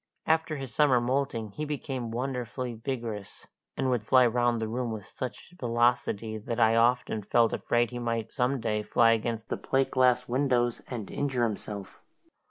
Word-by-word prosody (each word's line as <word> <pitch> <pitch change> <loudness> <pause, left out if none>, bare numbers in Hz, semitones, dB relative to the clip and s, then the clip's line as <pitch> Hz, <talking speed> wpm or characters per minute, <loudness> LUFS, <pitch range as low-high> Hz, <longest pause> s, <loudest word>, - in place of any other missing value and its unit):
After 160 0 +1
his 135 -3 -5
summer 145 -5 +4
moulting 120 -3 -1
he 150 - -5
became 135 -5 -4
wonderfully 125 0 -3
vigorous, 115 -4 -5 0.3
and 130 -1 +1
would 120 -4 0
fly 130 +3 +5
round 120 0 +2
the 110 - -2
room 120 +1 -2
with 105 -3 -6
such 125 +9 -7
velocity 115 -2 +1
that 115 +2 -4
I 115 0 +5
often 120 -1 +2
felt 115 +3 +2
afraid 120 0 +1
he 120 - -5
might 115 -2 -2
some 130 +2 +1
day 105 -2 -1
fly 115 +2 +4
against 115 0 -1
the - - -1
plate 135 0 0
glass 125 -1 +3
windows 120 -2 +1
and 115 -6 -6
injure 135 -4 0
himself. 105 -3 -4
120 Hz, 170 wpm, -28 LUFS, 115-130 Hz, 0.3 s, fly